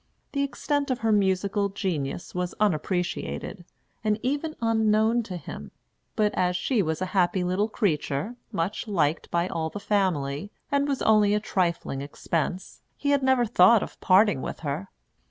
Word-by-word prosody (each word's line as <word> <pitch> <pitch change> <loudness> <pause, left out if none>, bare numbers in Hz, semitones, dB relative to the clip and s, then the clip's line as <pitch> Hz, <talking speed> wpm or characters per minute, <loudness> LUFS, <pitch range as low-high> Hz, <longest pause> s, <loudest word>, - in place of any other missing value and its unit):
The 280 - -1
extent 285 +1 -1
of 255 -3 -1
her 225 0 +2
musical 200 0 +1
genius 175 -7 -3
was 180 0 -3
unappreciated, 180 0 -1 0.4
and 215 0 +1
even 290 +5 -1
unknown 220 0 +2
to 190 -5 -6
him; 100 - -8 0.5
but 210 -1 +2
as 180 -1 +1
she 215 +5 +1
was 160 0 -1
a 185 - -5
happy 185 0 +2
little 185 +4 0
creature, 175 - -1 0.2
much 175 +7 -2
liked 160 -6 0
by 170 +1 +1
all 160 -3 -2
the 205 - -6
family, 180 -6 0 0.2
and 280 0 +2
was 275 -2 -1
only 210 -1 +4
a - - +2
trifling 170 -9 -1
expense, 165 +5 -3 0.2
he 285 - 0
had 285 -1 +3
never 260 -2 +3
thought 215 +1 +5
of - - -10
parting 190 -5 +4
with - - -5
her. 155 +6 -3
200 Hz, 160 wpm, -26 LUFS, 175-220 Hz, 0.5 s, thought